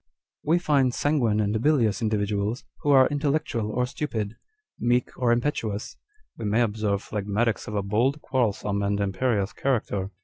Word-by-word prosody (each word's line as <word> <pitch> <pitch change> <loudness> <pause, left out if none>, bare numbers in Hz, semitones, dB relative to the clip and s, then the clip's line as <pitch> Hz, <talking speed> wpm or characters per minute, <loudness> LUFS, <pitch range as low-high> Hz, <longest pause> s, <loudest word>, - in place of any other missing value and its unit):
" - - -68
We 170 - +6
find 140 -7 +2
sanguine 125 -8 +1
and 105 +1 0
bilious 120 -8 +2
individuals, 105 +1 -1 0.2
"who 145 - -1
are 135 -2 +7
intellectual 145 -6 -1
or 125 +3 +1
stupid, 120 -6 -4 0.4
meek 120 +1 +1
or 125 -2 +1
impetuous; 120 -4 -1 0.4
we 115 - -6
may 105 +3 +2
observe 105 -2 -1
phlegmatics 105 +2 -1
of 105 - -5
a 100 - 0
bold, 120 +9 +1
quarrelsome, 105 -7 -1
and 100 0 0
imperious 100 +1 0
character. 105 -7 -1
115 Hz, 150 wpm, -25 LUFS, 105-130 Hz, 0.4 s, are